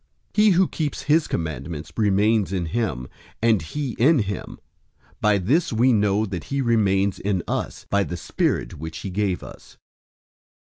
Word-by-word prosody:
003:024 - - -22
He 210 0 +6
who 185 0 +4
keeps 150 -4 -3
his 150 +2 +3
commandments 80 -1 -4
remains 105 -1 +2
in 90 -3 -1
him, 80 - -2 0.3
and 115 -3 +3
he 135 - -4
in 150 +7 +5
him. 100 -4 -3 0.6
By 105 -1 +3
this 130 - +1
we 120 +3 +3
know 105 0 +2
that 90 -5 -5
he 140 - -2
remains 100 -6 +2
in 95 -3 -1
us, - - -3
by 100 0 +2
the 90 - -5
Spirit 80 - -1
which 80 +1 -6
he 95 - -3
gave 100 -1 -1
us. - - -13
105 Hz, 165 wpm, -23 LUFS, 90-120 Hz, 0.6 s, He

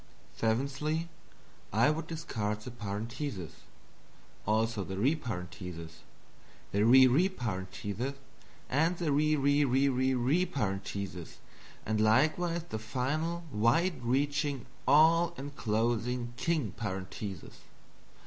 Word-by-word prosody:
Seventhly, 140 +8 -1 0.6
I 115 +8 +4
would 160 +2 -3
discard 105 -10 -3
the 125 - -7
Parenthesis. 110 - -5 1.0
Also 110 -1 +1
the 95 +1 -5
reparenthesis, 90 - -3 0.7
the 100 +1 +2
re 130 +3 +8
reparenthesis, 125 - -1 0.5
and 160 +6 +2
the 165 -4 0
re 155 +2 +3
re 140 +1 +3
re 135 +1 +3
re 130 0 +1
re 135 +9 +2
reparentheses, 100 - -4 0.5
and 110 0 0
likewise 155 +10 +3
the 110 -10 -5
final 145 +9 -2
wide 140 - +2
reaching 140 +2 0 0.2
all 165 +4 +5
enclosing 120 -2 -1
king 145 - 0
parenthesis. 95 -2 -6
125 Hz, 100 wpm, -31 LUFS, 105-150 Hz, 1.0 s, re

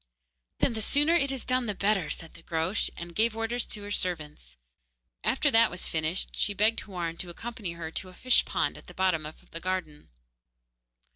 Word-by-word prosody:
'Then 255 - +2
the 220 - -3
sooner 290 +8 +4
it 280 -5 +3
is 265 -3 -4
done 255 -1 +1
the 210 - -2
better,' 200 -2 +1
said 165 - -4
the 170 - -14
Groac'h, 165 +5 0
and 170 0 -7
gave 220 +3 +2
orders 230 +1 -1
to 210 - -5
her 205 - -6
servants. 150 - -3 0.7
After 285 +2 +3
that 225 -1 +6
was 180 - -2
finished, 160 +3 -1
she 205 - +1
begged 215 +3 +3
Houarn 175 -4 -4
to 180 - -2
accompany 210 -1 -5
her 165 -1 -6
to 185 - -4
a 185 - -14
fish 255 +4 +4
pond - - -1
at - - -18
the - - -12
bottom 180 -5 +1
of 155 - -14
the 165 - -4
garden. 175 -4 -3
185 Hz, 200 wpm, -29 LUFS, 165-225 Hz, 0.7 s, that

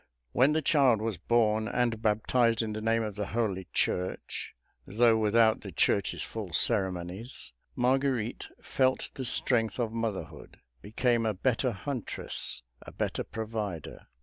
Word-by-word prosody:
When 135 - +4
the 155 0 0
child 135 -7 +4
was 110 -5 -3
born 110 +1 +2
and 120 -2 0
baptized 115 +2 +2
in 110 -1 -3
the 110 - -4
name 115 +1 +2
of 105 -1 -3
the 105 0 -4
Holy 100 -6 -1
Church, 90 +1 -2 0.3
though 115 +3 +4
without 110 0 +3
the 100 - -8
Church's 95 +3 +1
full 105 -6 -6
ceremonies, 95 - -1 0.2
Marguerite 125 -2 0 0.2
felt 130 -1 +1
the 130 - -5
strength 115 -3 +1
of 115 -3 -1
motherhood; 95 -10 -4 0.2
became 115 +2 +1
a 110 -2 0
better 125 +5 +1
huntress, 115 - -5 0.2
a - - -11
better - - -2
provider. 105 -7 -5
110 Hz, 140 wpm, -29 LUFS, 105-120 Hz, 0.3 s, When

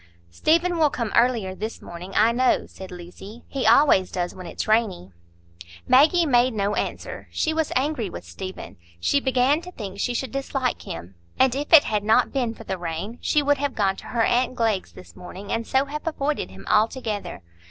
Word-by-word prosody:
"Stephen 335 - +2
will 305 -2 +5
come 235 -6 -3
earlier 235 -6 +2
this 215 +4 -6
morning, 175 +2 -9
I 225 +2 +5
know," 255 +2 +2
said 190 -1 -11
Lucy; 180 +6 -11
"he 265 -5 -2
always 230 -6 +5
does 175 -1 -2
when 185 -1 -9
it's - - -5
rainy." 215 - +1 0.8
Maggie 315 +6 +5
made 250 -3 +3
no 200 0 0
answer. - - -4
She 315 - -1
was 320 -1 -1
angry 260 -6 0
with - - -9
Stephen; 185 - -8 0.2
she 185 - +2
began 265 +3 +2
to 360 - -10
think 200 - -8
she 245 +4 -1
should 260 -1 -3
dislike 270 -2 -2
him; 85 +3 -8 0.2
and 260 -2 +4
if 285 +2 -4
it 320 -3 +9
had 210 -1 -1
not 220 +2 +3
been 245 -4 -1
for - - -11
the 190 -3 -4
rain, 175 +7 -5
she 300 - +2
would 285 -1 +2
have 285 -2 -2
gone 195 -2 +1
to - - -10
her 235 -2 0
aunt 250 +2 +1
Glegg's 220 - 0
this 85 -1 -14
morning, 190 +3 -9
and 230 0 -2
so 265 +1 +2
have 300 +3 -6
avoided 300 - -1
him 95 +1 -13
altogether. 215 - 0
230 Hz, 195 wpm, -24 LUFS, 190-275 Hz, 0.8 s, it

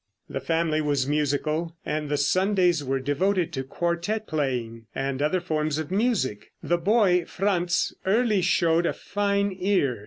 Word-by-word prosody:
The 135 - -4
family 160 0 0
was 145 -3 +1
musical, 150 +3 -1
and 150 -1 -2
the 145 - +1
Sundays 180 +1 +2
were 135 0 -1
devoted 175 +6 0
to 135 -3 -2
quartette 170 +9 -2
playing 125 - -3
and 135 0 -2
other 155 +5 +1
forms 155 -3 -1
of 155 +1 -4
music. 195 - 0
The 175 0 +1
boy 185 -2 +3
Franz 180 -3 0
early 210 0 +2
showed 170 -1 +2
a - - 0
fine 200 -1 -1
ear. 180 - +1
165 Hz, 150 wpm, -25 LUFS, 145-190 Hz, -, boy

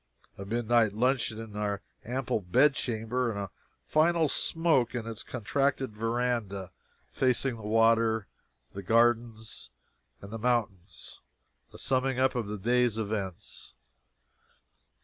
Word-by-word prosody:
A 100 - -8
midnight 115 0 +2
luncheon 120 0 +1
in 110 -2 -8
our 105 -1 -2 0.2
ample 125 0 -1
bed 105 +10 +4
chamber; 120 0 -1
a 100 -3 -5 0.3
final 160 +1 +3
smoke 155 -9 +2
in 115 -2 -3
its 115 -2 -5
contracted 135 +2 -1
veranda 115 -4 -1 0.4
facing 130 0 +1
the - - -10
water, 115 0 +3 0.5
the 100 - -6
gardens, 115 +1 +1 0.5
and 100 +2 -10
the 115 - -4
mountains; 105 -7 -2 0.5
a - - -12
summing 130 0 0
up 130 +1 +3
of 120 -5 -2
the 105 +1 -4
day's 120 +2 +2
events. 100 -4 -4
115 Hz, 120 wpm, -29 LUFS, 105-125 Hz, 0.5 s, bed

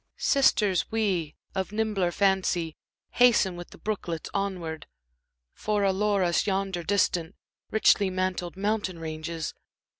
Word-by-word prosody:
Sisters, 210 - +3
we, 190 -9 0 0.2
of 190 0 -2
nimbler 210 -4 0
fancy, 185 -4 +1 0.4
hasten 230 -7 +4
with 175 0 -8
the - - -14
brooklets 175 -6 -4
onward; 180 -6 -3 0.7
For 210 -1 -1
allure 200 0 +2
us 175 +2 +1
yonder 195 -2 -1
distant, 175 -2 0 0.3
richly 205 -2 +4
mantled 185 -1 -2
mountain 205 -2 -1
ranges. 160 0 -5
190 Hz, 115 wpm, -27 LUFS, 170-205 Hz, 0.7 s, hasten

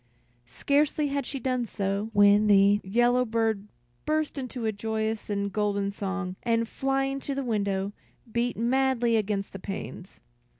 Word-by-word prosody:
Scarcely 290 - +1
had 280 0 -2
she 275 - -4
done 255 -2 -1
so, 200 +1 -2
when 205 0 +5
the 200 0 +5
yellow 240 +5 +3
bird 220 -3 -1 0.4
burst 310 0 0
into 255 -3 -4
a 220 - +2
joyous 220 +1 -3
and 200 -1 -2
golden 200 -1 0
song, 195 -2 -4
and 230 -1 +1
flying 270 +2 -1
to 275 0 -4
the 275 - -2
window, 200 -3 -1 0.4
beat 240 +1 -1
madly 240 0 +2
against 205 -2 -1
the 195 - -6
panes. 190 - -7
220 Hz, 145 wpm, -27 LUFS, 200-250 Hz, 0.4 s, when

